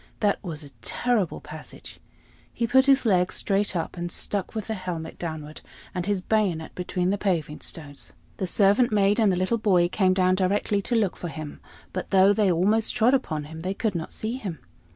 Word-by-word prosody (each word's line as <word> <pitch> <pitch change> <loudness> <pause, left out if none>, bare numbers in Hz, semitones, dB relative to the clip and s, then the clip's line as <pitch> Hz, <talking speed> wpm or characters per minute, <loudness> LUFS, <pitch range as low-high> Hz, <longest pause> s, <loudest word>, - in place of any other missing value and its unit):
That 205 0 +1
was 160 -5 -4
a 140 - -12
terrible 220 - 0
passage! 155 +1 -11 0.5
He 235 - -1
put 265 +3 +4
his 275 -2 +5
leg 180 -4 +3
straight 200 -1 0
up, 165 +1 -2
and 175 0 -3
stuck 200 +4 -3
with 215 -2 -3
helmet 185 -6 -5
downward 155 -3 -6 0.3
and 180 0 -3
his 200 -3 0
bayonet 185 -8 0
between 180 0 -1
the 200 - -1
paving 165 -7 -1
stones. 145 -4 -7 0.3
The 190 - -1
servant 205 +6 +4
maid 205 +1 +3
and 215 -3 +4
the - - +1
little 185 +6 0
boy 180 -5 +3
came 185 -1 +2
down 185 -1 +3
directly 200 +2 +1
to 235 - -1
look 210 -5 +1
for 175 - -6
him, 155 -2 -7 0.3
but 185 - -4
though 195 +1 +5
they 205 -3 +3
almost 205 +6 +2
trod 230 +4 +4
upon 160 - 0
him, 160 +2 -9
they 185 +4 -3
could 220 -2 -1
not 165 -2 -4
see 225 +3 -3
him. 190 -10 -5
190 Hz, 195 wpm, -25 LUFS, 170-210 Hz, 0.5 s, his